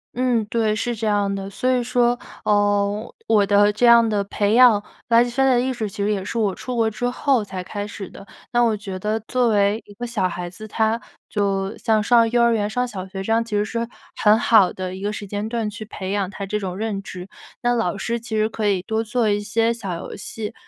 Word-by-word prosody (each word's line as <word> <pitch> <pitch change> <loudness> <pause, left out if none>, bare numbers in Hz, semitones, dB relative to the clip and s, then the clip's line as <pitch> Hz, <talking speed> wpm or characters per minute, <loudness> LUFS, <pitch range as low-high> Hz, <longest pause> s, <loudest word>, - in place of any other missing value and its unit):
嗯， 245 -3 +1
对， 220 -1 +1
是 240 +2 -1
这 220 0 -3
样 205 -1 +1
的。 195 0 -5
所 255 +6 -1
以 250 -1 +2
说， 240 0 +1 0.2
呃， 205 +1 +1
我 215 -2 +4
的 205 +1 +4
这 215 +4 +1
样 235 -1 +7
的 210 -2 +1
培 205 +2 0
养 240 -5 +6 0.2
垃 235 0 +5
圾 245 - -4
分 270 +2 +2
类 255 - +4
的 240 - +3
意 260 - -1
识 225 -4 -3
其 200 0 -4
实 210 - +1
也 195 -2 -1
是 230 - -4
我 205 -4 +1
出 250 +5 -6
国 225 -1 +2
之 245 +3 -2
后 250 -2 +1
才 185 -2 -6
开 205 +2 -5
始 200 -2 -8
的。 200 - -13 0.2
那 240 0 +3
我 230 -2 +3
觉 195 -3 -6
得 215 +3 -1
作 245 +2 0
为 205 0 +2
一 205 - -14
个 240 +4 -6
小 215 -6 0
孩 175 0 -5
子， 215 +4 -9
他 220 +2 0 0.3
就 195 -1 -1
像 220 -2 +1
上 230 0 +4
幼 240 0 +3
儿 235 - +4
园 210 -2 0
上 250 +3 0
小 190 -6 -6
学 190 0 -6
这 225 - -3
样， 225 +1 +3
其 215 -2 -4
实 205 - +2
是 230 +2 -3 0.3
很 210 +1 +5
好 220 -5 +4
的 185 -1 -5
一 190 - -8
个 205 +1 -2
时 210 - -6
间 205 +2 -4
段 225 -2 -2
去 210 +1 -8
培 195 -3 -6
养 200 -2 -1
他 200 -1 -6
这 210 +2 -2
种 185 -2 -4
认 210 -2 -2
知。 185 0 -9 0.3
那 245 0 +2
老 200 -5 0
师 235 +2 -2
其 225 -1 -6
实 215 +1 +2
可 215 -1 -2
以 190 -3 +1
多 220 +3 -1
做 235 -1 +1
一 205 - +1
些 225 +3 +1
小 195 -6 -5
游 170 - -7
戏， 210 +1 -6
215 Hz, 270 characters per minute, -22 LUFS, 200-235 Hz, 0.3 s, 样